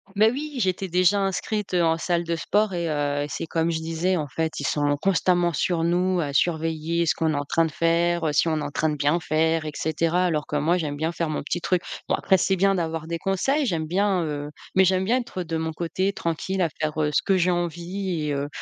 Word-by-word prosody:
Mais 215 +2 +5
oui, 290 +3 -5
j'étais 190 -2 0
déjà 185 +3 +3
inscrite, 195 +1 -2
heu, 175 -1 +3
en 165 0 +2
salle 170 +1 0
de 170 0 -1
sport 205 +5 +1
et 170 -1 -1
heu, 145 -1 0
c'est 150 - -5
comme 165 +1 0
je 160 - -1
disais, 165 +3 -1
en 150 -3 -2
fait, 160 +4 -3
ils - - -4
sont 145 -1 +1
constamment 175 -1 +2
sur 165 +1 0
nous 180 +2 +1
à 145 -4 -1
surveiller 165 +2 0
ce - - +2
qu'on 160 -1 0
est - - -1
en 145 - -1
train 165 +3 +1
de 160 - -3
faire, 170 +2 +1
heu, - - +1
si 150 +3 +2
on 160 -1 +1
est - - -4
en - - -3
train 155 +2 0
de 150 - -1
bien 145 +4 +1
faire, 160 0 +1
et 155 - -3
cetera, 165 +4 0
alors 155 -4 0
que 150 - -2
moi, 160 +5 +2
j'aime 150 -4 -3
bien 160 +3 -1
faire 170 -2 -2
mon 155 - -2
petit 175 - -2
truc. 180 0 0 0.3
Bon, - - 0
après, 190 - +3
c'est 190 +2 +1
bien 195 +1 +3
d'avoir 165 -2 -3
des 170 0 -2
conseils, 230 - 0
j'aime 165 -8 -1
bien, 190 +2 +1
heu, 150 -1 -4 0.2
mais 190 0 +6
j'aime 185 0 +2
bien 235 +5 +2
être 185 -6 -6
de 165 -2 -3
mon 160 0 -2
côté, 185 +4 -1
tranquille, 185 +2 -2
à 170 - +2
faire, 155 +1 -3
heu, 150 - +2
ce - - +1
que 195 - +2
j'ai 180 0 +2
envie 175 0 -2
et 145 - 0
heu, 140 0 -2
170 Hz, 255 wpm, -24 LUFS, 155-185 Hz, 0.3 s, mais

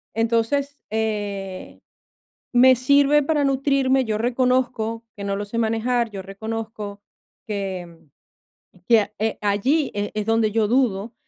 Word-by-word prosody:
Entonces, 230 +6 0
eh, 205 -3 -3 0.7
me 255 +1 +6
sirve 280 +3 +4
para 295 0 +1
nutrirme. 270 -1 +2
Yo 215 -2 -1
reconozco 245 -2 0
que 200 - -6
no 200 0 -1
lo 205 - -3
sé 205 +3 -5
manejar. 230 +1 0
Yo 195 -2 -6
reconozco 215 +1 -6 0.5
que 190 -5 -5 0.9
que, 225 -4 +5
eh, 220 +1 -1
allí, 235 +9 +1
eh, 205 0 -2
es 210 -1 -2
donde 225 -1 +2
yo 215 0 +1
dudo. 230 -3 +1
225 Hz, 130 wpm, -22 LUFS, 205-255 Hz, 0.9 s, me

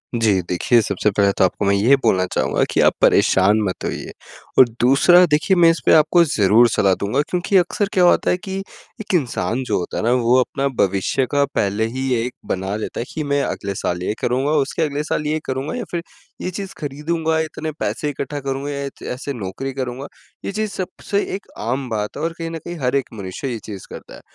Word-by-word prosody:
जी। 105 -5 +2
देखिए 115 +6 +3
सबसे 100 +1 0
पहले 100 0 +3
तो - - +4
आपको 95 +2 0
मैं 100 - +3
ये 115 +8 +5
बोलना 95 -5 +3
चाहूँगा - - +1
कि - - 0
आप - - +4
परेशान 100 +3 +4
मत 95 -3 -3
होइए - - -4 0.5
और 130 - +9
दूसरा 175 +8 +6
देखिए 175 +5 +3
मैं 170 -1 +6
इसपे 165 - +2
आपको 160 +2 +5
ज़रूर 115 - +4
सलाह 95 -1 +2
दूँगा 125 +8 0
क्योंकि 180 +2 +1
अक्सर 185 +3 +1
क्या 180 - +3
होता 175 - +4
है 180 - +1
कि 190 0 -6 0.4
एक 210 -2 -5
इंसान 120 - -1
जो - - -1
होता 90 - -5
है - - -2
ना 120 - +2
वो 120 +2 +4
अपना 135 +2 0
भविष्य 100 +7 +1
का 145 0 +3
पहले 105 +3 +1
ही 130 -1 0
एक 125 +1 -3
बना 95 +2 -2
लेता 110 - -5
है 120 - -3
कि 155 - -3
मैं 140 0 0
अगले 100 -1 -3
साल 90 -1 -2
ये 105 - -1
करूँगा, 130 +4 0
उसके 150 +2 0
अगले 145 0 -2
साल 150 0 -2
ये 155 +1 0
करूँगा 135 +3 -3
या 245 - -3
फ़िर 170 -1 -2 0.4
ये 180 - -2
चीज़ 195 +1 -6
खरीदूँगा, 160 +3 -1
इतने 160 0 -3
पैसे 150 - -2
इकट्ठा 145 +1 -4
करूँगा 135 +1 -4
या 140 0 -4
इत 140 - -9
ऐसे 140 +2 -5
नौकरी 120 +5 -5
करूँगा 130 +1 -4 0.4
ये - - -2
चीज़ 215 0 -2
सबसे 195 +2 -3
एक 200 - -9
आम 130 +4 -2
बात 105 +1 -3
है 150 - -4
और 165 0 -1
कहीं 165 -1 -4
न 165 - -4
कहीं 175 0 -6
हर 125 +1 0
एक 135 - +1
मनुष्य 100 +5 -6
ये 115 - -4
चीज़ 100 -3 -8
करता - - -10
है - - -14
135 Hz, 220 wpm, -20 LUFS, 110-160 Hz, 0.5 s, और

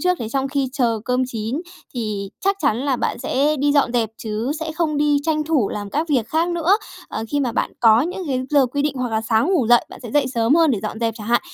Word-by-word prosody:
trước, 360 -1 +1
để 220 - -4
trong 270 +2 -1
khi 275 -2 -1
chờ 235 -5 0
cơm 250 0 +1
chín 235 +5 -3 0.3
thì 210 -4 -3
chắc 395 +1 +1
chắn 220 - +2
là 270 -1 0
bạn - - -2
sẽ 290 +5 +1
đi 285 +1 +2
dọn 280 -4 +2
dẹp 225 -3 +1
chứ 220 +3 -3
sẽ 320 -1 -3
không 315 -3 -1
đi 295 0 +3
tranh 305 -1 0
thủ 295 -10 +1
làm 205 -1 -5
các 315 +3 -1
việc 250 -7 +1
khác 330 +2 +1
nữa. 345 +3 +3 0.3
Ờ, 220 - -4
khi 290 -1 0
mà 245 -4 -1
bạn - - -1
có 225 -1 +6
những 360 +6 -3
cái 260 -2 0
giờ 280 -3 +4
quy 285 +3 -2
định 295 -1 0
hoặc 250 -1 -1
là 220 - +1
sáng 225 +4 +1
ngủ 265 -11 +2
dậy, 240 0 +5
bạn - - -11
sẽ 235 - -7
dậy 285 -1 +2
sớm 235 +2 +2
hơn 330 -3 +4
để 220 - +1
dọn 215 +1 -4
dẹp 225 -2 0
chẳng 210 -1 -8
hạn. 240 +1 +3
260 Hz, 270 wpm, -21 LUFS, 230-300 Hz, 0.3 s, có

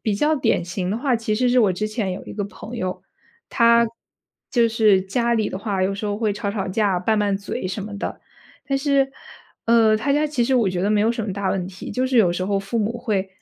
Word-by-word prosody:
比 215 - 0
较 300 +9 +2
典 245 - +1
型 180 +1 -3
的 210 - -1
话 260 0 +1
其 225 -2 -1
实 250 +2 +2
是 250 - +4
我 210 -5 +4
之 215 +3 -2
前 215 -4 -2
有 185 - -7
一 - - -8
个 205 - -3
朋 215 +4 -9
友， 185 -4 -3 0.5
他 235 -1 +5 0.6
就 235 -3 +3
是 215 -4 +3
家 235 +5 0
里 215 -2 0
的 190 - -4
话 200 -3 -2
有 195 +1 0
时 210 +2 -4
候 205 0 -1
会 215 -1 0
吵 205 0 -3
吵 200 -2 -3
架， 195 -1 +1
拌 215 +4 +1
拌 205 -1 +1
嘴 195 -2 -4
什 195 +2 -4
么 210 - -7
的， - - -4 0.5
但 275 -1 0
是 275 -1 +1 0.5
呃， 230 -2 +5
他 280 +6 -1
家 300 +1 +2
其 295 -5 -1
实 260 +3 +1
我 225 -7 +3
觉 180 - -2
得 195 - +1
没 210 -1 +3
有 225 +2 +2
什 230 - -3
么 195 - -3
大 200 -1 -1
问 185 -2 -1
题， 190 0 -8
就 255 +5 0
是 260 -1 0
有 190 -7 +5
时 175 - -3
候 200 -1 +1
父 195 +4 -3
母 220 +2 -1
会 210 -6 -1
215 Hz, 275 characters per minute, -22 LUFS, 195-235 Hz, 0.6 s, 他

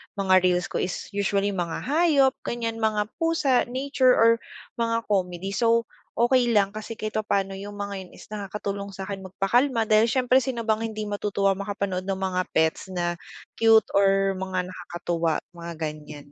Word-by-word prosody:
mga 190 -2 +4
reels 180 0 +1
ko - - -2
is 180 - -3
usually 200 0 0
mga 175 -4 -3
hayop 290 -2 +3 0.2
ganyan 230 -1 -3
mga 215 -1 0
pusa, 325 -6 +2
nature 260 0 +2
or 230 0 +6 0.5
mga 230 0 0
comedy. 185 -1 -1
So, 230 +2 +2 0.3
okey 240 0 +3
lang 200 -1 +3
kasi 215 +2 -7
kahit 215 0 -4
papano 195 -2 -1
yung 205 +1 -8
mga 200 -2 -5
yun - - -21
is - - -13
nakakatulong 200 -1 -5
sakin 195 +1 -5
magpakalma 230 +6 +1
dahil 215 +1 +4
siyempre 255 +1 +3
sino 255 -3 -3
bang 220 -1 +1
hindi 215 0 -4
matutuwa 205 -1 0
makapanood 200 -2 -3
ng 195 -1 -2
mga 185 -1 0
pets 160 +4 +1
na 175 -1 -1 0.4
cute 225 -2 +6
or 195 0 +3
mga 185 -1 -2
nakakatuwa 170 -3 -2
mga 170 -1 -8
ganyan. 150 -2 -7
200 Hz, 160 wpm, -25 LUFS, 190-230 Hz, 0.5 s, or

